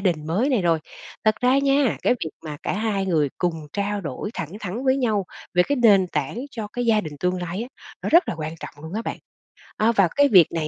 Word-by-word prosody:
đình 170 Hz, -6 st, 0 dB
mới 195 Hz, -, +1 dB
này 250 Hz, -9 st, +2 dB
rồi. 165 Hz, -2 st, +3 dB, 0.5 s
Thật 215 Hz, 0 st, +4 dB
ra 250 Hz, +2 st, +4 dB
nha, 275 Hz, -3 st, +2 dB
cái -, -, +3 dB
việc 160 Hz, -, -4 dB
mà 150 Hz, -2 st, -5 dB
cả -, -, -1 dB
hai 205 Hz, -2 st, -1 dB
người 155 Hz, -5 st, +2 dB
cùng 175 Hz, -2 st, 0 dB, 0.2 s
trao 205 Hz, 0 st, -1 dB
đổi 165 Hz, +4 st, -5 dB
thẳng 165 Hz, 0 st, -5 dB
thắn 210 Hz, +6 st, -4 dB
với 260 Hz, 0 st, +3 dB
nhau 220 Hz, -7 st, +1 dB, 0.3 s
về 180 Hz, -, +6 dB
cái 285 Hz, -, +1 dB
nền 205 Hz, -7 st, +5 dB
tảng 150 Hz, -, -3 dB
cho 220 Hz, -6 st, -5 dB
cái 245 Hz, -1 st, -2 dB
gia 220 Hz, -2 st, +4 dB
đình 155 Hz, -6 st, -7 dB
tương 180 Hz, 0 st, 0 dB
lai 175 Hz, +5 st, -3 dB
á 245 Hz, -, -7 dB, 0.3 s
nó -, -, -2 dB
rất 340 Hz, 0 st, +5 dB
là -, -, -1 dB
quan 155 Hz, +1 st, -4 dB
trọng 145 Hz, -, -9 dB
luôn 160 Hz, +4 st, -7 dB
á 220 Hz, -, -2 dB
bạn, -, -, -4 dB, 0.6 s
à, 220 Hz, +2 st, +3 dB
và 200 Hz, -5 st, +4 dB
cái 285 Hz, 0 st, +5 dB
việc 185 Hz, -, +7 dB
này 160 Hz, -2 st, -2 dB
200 Hz, 245 wpm, -23 LUFS, 170-235 Hz, 0.6 s, việc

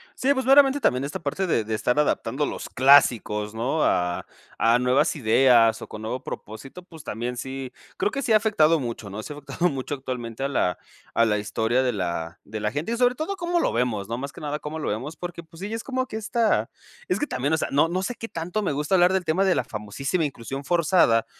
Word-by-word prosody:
Sí, 275 Hz, +2 st, +2 dB
pues 265 Hz, -2 st, -2 dB
veramente 275 Hz, +1 st, +6 dB
también 130 Hz, -, +1 dB
esta 140 Hz, +1 st, -4 dB
parte 165 Hz, +5 st, -2 dB
de 120 Hz, -10 st, +1 dB
de 110 Hz, +1 st, -2 dB
estar 125 Hz, +6 st, +1 dB
adaptando 145 Hz, -1 st, 0 dB
los -, -, -5 dB
clásicos, 120 Hz, -6 st, +4 dB
¿no?, 125 Hz, +8 st, 0 dB
a 90 Hz, 0 st, +1 dB, 0.3 s
a 115 Hz, +2 st, +4 dB
nuevas 130 Hz, +6 st, +2 dB
ideas, 115 Hz, -3 st, +4 dB
o -, -, -9 dB
con 110 Hz, -, -9 dB
nuevo 125 Hz, +4 st, -4 dB
propósito, 135 Hz, -, -8 dB
pues 165 Hz, -4 st, -13 dB
también 120 Hz, -1 st, -4 dB
sí, 130 Hz, 0 st, -5 dB, 0.2 s
creo 205 Hz, -, 0 dB
que 275 Hz, +2 st, -3 dB
sí 230 Hz, -, -1 dB
ha -, -, +8 dB
afectado 185 Hz, -7 st, +3 dB
mucho, 115 Hz, -6 st, -5 dB
¿no?, 105 Hz, +2 st, -5 dB
si 150 Hz, -, -8 dB
ha -, -, -6 dB
afectado 145 Hz, +5 st, -1 dB
mucho 135 Hz, 0 st, -4 dB
actualmente 125 Hz, -3 st, -6 dB
a -, -, +1 dB
la 105 Hz, -10 st, 0 dB, 0.4 s
a 115 Hz, -, +4 dB
la 105 Hz, -2 st, +1 dB
historia 110 Hz, +4 st, 0 dB
de 125 Hz, -, +1 dB
la 85 Hz, -3 st, -3 dB
de 110 Hz, -, -6 dB
la 105 Hz, 0 st, -1 dB
gente. 150 Hz, -, -3 dB
Y -, -, -2 dB
sobre 245 Hz, 0 st, +3 dB
todo, 325 Hz, +8 st, -3 dB
cómo 345 Hz, -1 st, 0 dB
lo -, -, +1 dB
vemos, 115 Hz, -4 st, -1 dB
¿no?, 115 Hz, -, -2 dB
más 140 Hz, +2 st, -5 dB
que -, -, -12 dB
nada, 150 Hz, 0 st, -2 dB
cómo 155 Hz, +2 st, -6 dB
lo -, -, -2 dB
vemos. 130 Hz, +10 st, -4 dB
Porque 175 Hz, 0 st, -7 dB
pues 165 Hz, +2 st, -16 dB
sí, 200 Hz, -, -4 dB
ya 225 Hz, -, -3 dB
es 225 Hz, -, -5 dB
como 260 Hz, -1 st, -2 dB
que -, -, -8 dB
esta 220 Hz, +1 st, +1 dB, 0.4 s
es -, -, 0 dB
que 295 Hz, -, -1 dB
también, 140 Hz, -, -1 dB
o 160 Hz, -, +3 dB
sea, -, -, -1 dB
no 145 Hz, +4 st, +4 dB
no 180 Hz, +2 st, -1 dB
sé 220 Hz, +6 st, -3 dB
qué 225 Hz, -, -7 dB
tanto 175 Hz, +3 st, -3 dB
me 185 Hz, -, 0 dB
gusta 150 Hz, +6 st, 0 dB
hablar 180 Hz, +1 st, +5 dB
del 190 Hz, -1 st, 0 dB
tema 175 Hz, +5 st, +2 dB
de 190 Hz, -, +4 dB
la -, -, +1 dB
famosísima 125 Hz, -, -2 dB
inclusión 135 Hz, 0 st, -5 dB
forzada, 155 Hz, -8 st, +3 dB
140 Hz, 245 wpm, -24 LUFS, 115-180 Hz, 0.4 s, ha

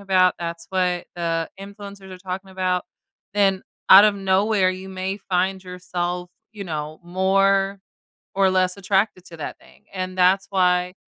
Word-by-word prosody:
about, 185 Hz, -2 st, +3 dB
that's 170 Hz, 0 st, -5 dB
what 180 Hz, -2 st, 0 dB
the 165 Hz, -1 st, -2 dB
influencers 200 Hz, -1 st, -10 dB
are 185 Hz, -, -9 dB
talking 190 Hz, +1 st, -6 dB
about, 185 Hz, -1 st, -1 dB, 0.5 s
then 195 Hz, -2 st, +2 dB, 0.3 s
out 195 Hz, +2 st, +11 dB
of 210 Hz, -1 st, +4 dB
nowhere, 195 Hz, 0 st, +2 dB
you 185 Hz, +1 st, -7 dB
may 190 Hz, +1 st, -4 dB
find 190 Hz, 0 st, -1 dB
yourself, 180 Hz, -1 st, -4 dB, 0.2 s
you 205 Hz, -2 st, -7 dB
know, 155 Hz, -2 st, -5 dB
more 195 Hz, +2 st, +2 dB, 0.5 s
or 195 Hz, -1 st, +3 dB
less 185 Hz, 0 st, +1 dB
attracted 195 Hz, -1 st, 0 dB
to 165 Hz, -, -11 dB
that 155 Hz, -, -6 dB
thing, -, -, -21 dB
and 185 Hz, 0 st, -4 dB
that's 190 Hz, +2 st, +4 dB
why 180 Hz, -1 st, +2 dB
185 Hz, 150 wpm, -22 LUFS, 180-195 Hz, 0.5 s, out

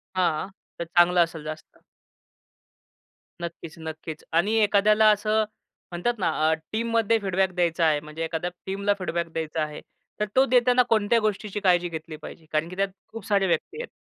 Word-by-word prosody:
हां, 180 Hz, -1 st, +1 dB, 0.3 s
तर 170 Hz, -, -2 dB
चांगलं 175 Hz, +1 st, +4 dB
असेल 165 Hz, -2 st, -6 dB
जास्त. 155 Hz, 0 st, -8 dB, 1.6 s
नक्कीच, 170 Hz, -1 st, -7 dB
नक्कीच 160 Hz, -1 st, -7 dB
आणि 185 Hz, +7 st, +2 dB
एखाद्याला 210 Hz, +1 st, +4 dB
असं 215 Hz, +1 st, +2 dB, 0.5 s
म्हणतात 175 Hz, +8 st, 0 dB
ना, 180 Hz, -, +1 dB, 0.2 s
अ, -, -, +4 dB, 0.2 s
टीममध्ये 230 Hz, 0 st, +1 dB
फीडबॅक 190 Hz, -2 st, 0 dB
द्यायचा 170 Hz, -1 st, +2 dB
आहे 155 Hz, -2 st, +3 dB
म्हणजे 155 Hz, +2 st, -6 dB
एखाद्या 165 Hz, +2 st, -2 dB, 0.2 s
टीमला 200 Hz, +1 st, 0 dB
फीडबॅक 170 Hz, -2 st, -2 dB
द्यायचा 160 Hz, 0 st, -2 dB
आहे. 150 Hz, -1 st, -6 dB, 0.4 s
तर 210 Hz, -, +1 dB
तो 265 Hz, +1 st, +6 dB
देताना 250 Hz, 0 st, +4 dB
कोणत्या 225 Hz, +1 st, +3 dB
गोष्टीची 210 Hz, -1 st, -2 dB
काळजी 180 Hz, -3 st, +3 dB
घेतली 160 Hz, -1 st, -7 dB
पाहिजे? 160 Hz, +1 st, -11 dB
कारण 155 Hz, +2 st, 0 dB
की 180 Hz, -, -8 dB
त्यात 195 Hz, +1 st, 0 dB, 0.2 s
खूप 225 Hz, -3 st, -8 dB
सारे 200 Hz, -2 st, +2 dB
व्यक्ती 175 Hz, -, -1 dB
आहेत. -, -, -7 dB
180 Hz, 160 wpm, -25 LUFS, 165-210 Hz, 1.6 s, तो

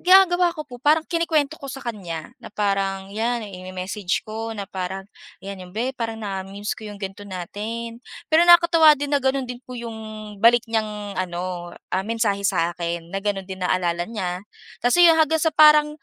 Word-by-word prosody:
Ginagawa 360 Hz, -1 st, +5 dB
ko 305 Hz, -, -4 dB
po 245 Hz, -, -9 dB
parang 310 Hz, +4 st, +3 dB
kinukwento 320 Hz, -3 st, +1 dB
ko -, -, -10 dB
sa 270 Hz, -, -7 dB
kanya 175 Hz, -9 st, -5 dB
na -, -, -8 dB
parang 195 Hz, -2 st, -1 dB
yan, 230 Hz, +1 st, -1 dB
i-me-message 185 Hz, 0 st, -3 dB
ko 225 Hz, +1 st, -5 dB
na 200 Hz, -, -4 dB
parang, 190 Hz, +1 st, -4 dB, 0.4 s
yan 195 Hz, 0 st, -7 dB
yung, 180 Hz, -, -14 dB
"Be 245 Hz, +4 st, -1 dB
parang 225 Hz, -1 st, -4 dB
na-mimiss 195 Hz, 0 st, -4 dB
ko 220 Hz, -, -10 dB
yung 205 Hz, 0 st, -10 dB
ganito 195 Hz, +1 st, -6 dB
natin." 220 Hz, +5 st, -6 dB, 0.3 s
Pero 320 Hz, +2 st, +6 dB
nakakatuwa 340 Hz, -2 st, +8 dB
din 285 Hz, 0 st, -3 dB
na -, -, 0 dB
ganun 265 Hz, 0 st, +1 dB
din 245 Hz, -1 st, -6 dB
po 255 Hz, -, -10 dB
yung 230 Hz, -1 st, -6 dB, 0.4 s
balik 235 Hz, +2 st, +5 dB
niyang 210 Hz, -3 st, -2 dB
ano, 175 Hz, -1 st, -4 dB, 0.2 s
ah, 185 Hz, +1 st, 0 dB
mensahe 220 Hz, -3 st, 0 dB
sa'kin 170 Hz, -2 st, -1 dB
na 195 Hz, -, -1 dB
ganun 195 Hz, -2 st, -1 dB
din 190 Hz, -1 st, -7 dB
naalala 175 Hz, -1 st, 0 dB
niya. 185 Hz, -5 st, -3 dB, 0.4 s
Kasi 350 Hz, +8 st, +6 dB
yung 325 Hz, -, +6 dB
hanggang 320 Hz, +1 st, +3 dB
sa 320 Hz, -, +4 dB
parang, 300 Hz, -1 st, +7 dB
210 Hz, 180 wpm, -23 LUFS, 190-265 Hz, 0.4 s, nakakatuwa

